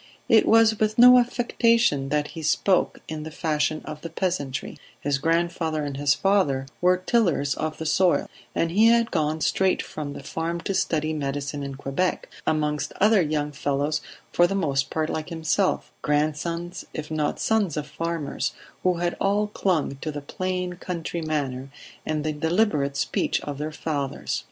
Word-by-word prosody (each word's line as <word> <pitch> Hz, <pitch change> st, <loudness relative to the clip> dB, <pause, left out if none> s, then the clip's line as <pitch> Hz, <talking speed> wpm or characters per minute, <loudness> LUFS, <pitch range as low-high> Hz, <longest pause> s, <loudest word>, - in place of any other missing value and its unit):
It 225 Hz, -, +5 dB
was 225 Hz, -1 st, +5 dB
with 215 Hz, 0 st, +1 dB
no 250 Hz, +1 st, +9 dB
affectation 235 Hz, -, +2 dB
that 150 Hz, 0 st, 0 dB
he 165 Hz, -, -7 dB
spoke 175 Hz, +4 st, +1 dB
in 155 Hz, -1 st, -5 dB
the 155 Hz, -, -6 dB
fashion 155 Hz, -1 st, -1 dB
of 150 Hz, 0 st, -7 dB
the 165 Hz, -, -6 dB
peasantry; 160 Hz, -6 st, -3 dB, 0.2 s
his 140 Hz, -1 st, 0 dB
grandfather 165 Hz, -1 st, 0 dB
and 145 Hz, -1 st, -4 dB
his 140 Hz, 0 st, +2 dB
father 185 Hz, -10 st, +2 dB, 0.2 s
were 180 Hz, +1 st, +4 dB
tillers 180 Hz, -, +1 dB
of 155 Hz, 0 st, -3 dB
the 160 Hz, -, -5 dB
soil, 180 Hz, +3 st, +3 dB, 0.3 s
and 165 Hz, -, +1 dB
he 215 Hz, +5 st, +5 dB
had 230 Hz, 0 st, +4 dB
gone 155 Hz, -1 st, 0 dB
straight 190 Hz, +3 st, +2 dB
from 145 Hz, -2 st, -5 dB
the 140 Hz, -, -9 dB
farm 165 Hz, +4 st, -3 dB
to 195 Hz, -, -2 dB
study 155 Hz, -4 st, 0 dB
medicine 145 Hz, 0 st, -3 dB
in 140 Hz, -1 st, -5 dB
Quebec, 140 Hz, +7 st, -1 dB, 0.2 s
amongst 150 Hz, -2 st, 0 dB
other 210 Hz, 0 st, +5 dB
young 150 Hz, -2 st, -1 dB
fellows 145 Hz, +1 st, -1 dB, 0.3 s
for 175 Hz, -, +5 dB
the 195 Hz, -, -2 dB
most 140 Hz, -7 st, 0 dB
part 155 Hz, -1 st, -1 dB
like 155 Hz, +1 st, -4 dB
himself 165 Hz, +3 st, 0 dB
grandsons, 160 Hz, +4 st, -1 dB
if 155 Hz, 0 st, -5 dB
not 150 Hz, -2 st, -1 dB
sons 205 Hz, -8 st, +1 dB
of 150 Hz, -, -2 dB
farmers 165 Hz, -2 st, -3 dB, 0.3 s
who 180 Hz, -1 st, +2 dB
had 175 Hz, 0 st, -1 dB
all 200 Hz, +2 st, +2 dB
clung 180 Hz, -9 st, -1 dB
to 155 Hz, +3 st, -4 dB
the 145 Hz, -, -5 dB
plain 180 Hz, +3 st, -3 dB
country 170 Hz, -2 st, -4 dB
manner 140 Hz, -4 st, -2 dB, 0.4 s
and 155 Hz, -1 st, -1 dB
the 155 Hz, 0 st, -1 dB
deliberate 150 Hz, -3 st, +1 dB
speech -, -, 0 dB
of 145 Hz, -1 st, -6 dB
their 155 Hz, +1 st, -3 dB
fathers. 145 Hz, -3 st, -3 dB
160 Hz, 170 wpm, -25 LUFS, 150-185 Hz, 0.4 s, no